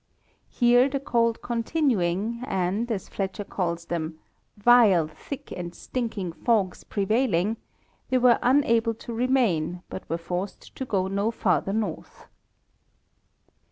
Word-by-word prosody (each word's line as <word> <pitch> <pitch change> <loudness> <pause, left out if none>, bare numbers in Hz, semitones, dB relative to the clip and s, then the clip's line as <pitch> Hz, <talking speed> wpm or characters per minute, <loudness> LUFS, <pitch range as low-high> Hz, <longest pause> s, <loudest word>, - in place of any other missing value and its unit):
Here 245 +2 +4
the 275 0 -2
cold 230 -4 0
continuing 230 - 0
and, 195 +2 -1
as 200 -4 -3
Fletcher 195 +1 -4
calls 170 -4 -3
them, 160 -2 -3 0.4
"vile, 205 -7 +5
thick 280 - -9
and 175 -1 -6
stinking 220 -8 -4
fogges 205 -3 0
prevailing," 210 -1 +1
§ - - -32 0.5
they 260 - +3
were 245 -2 +5
unabfe 230 -4 +3
to 235 - -7
remain, 210 -9 +1
but 190 - -7
were 165 - 0
forced 180 +3 -5
to 265 - -4
go 195 -6 0
no 200 +3 0
farther 195 -3 0
north. 210 -7 -4
215 Hz, 125 wpm, -26 LUFS, 180-240 Hz, 0.5 s, vile